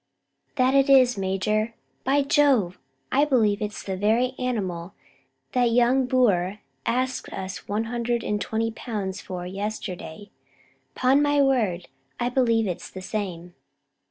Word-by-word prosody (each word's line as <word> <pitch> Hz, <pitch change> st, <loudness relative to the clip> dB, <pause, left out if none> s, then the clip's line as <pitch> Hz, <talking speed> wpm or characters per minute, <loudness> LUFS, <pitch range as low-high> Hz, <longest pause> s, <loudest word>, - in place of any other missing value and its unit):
"That 260 Hz, -1 st, +3 dB
it 275 Hz, 0 st, +4 dB
is, 255 Hz, -2 st, +6 dB
major. 210 Hz, +4 st, -1 dB, 0.3 s
By 280 Hz, +2 st, +2 dB
Jove, 275 Hz, -11 st, +3 dB, 0.3 s
I 280 Hz, +2 st, +4 dB
believe 220 Hz, -8 st, +2 dB
it's 210 Hz, 0 st, -4 dB
the 190 Hz, -, -3 dB
very 225 Hz, +6 st, +2 dB
animal 195 Hz, -8 st, -3 dB, 0.6 s
that 250 Hz, -1 st, +2 dB
young 245 Hz, +2 st, +3 dB
Boer 205 Hz, -7 st, +2 dB, 0.3 s
asked 255 Hz, +2 st, -1 dB
us 190 Hz, 0 st, -6 dB
one 210 Hz, +2 st, -1 dB
hundred 235 Hz, 0 st, -2 dB
and 210 Hz, -1 st, -1 dB
twenty 225 Hz, +4 st, -1 dB
pounds 205 Hz, -4 st, -4 dB
for 180 Hz, -1 st, -6 dB
yesterday; 200 Hz, -1 st, -6 dB, 0.6 s
'pon 265 Hz, +3 st, +3 dB
my 290 Hz, 0 st, +2 dB
word, 225 Hz, -11 st, +1 dB, 0.3 s
I 240 Hz, -, 0 dB
believe 230 Hz, -3 st, +2 dB
it's 180 Hz, -4 st, -4 dB
the 185 Hz, -, -9 dB
same." 180 Hz, -4 st, -4 dB
225 Hz, 135 wpm, -25 LUFS, 190-255 Hz, 0.6 s, is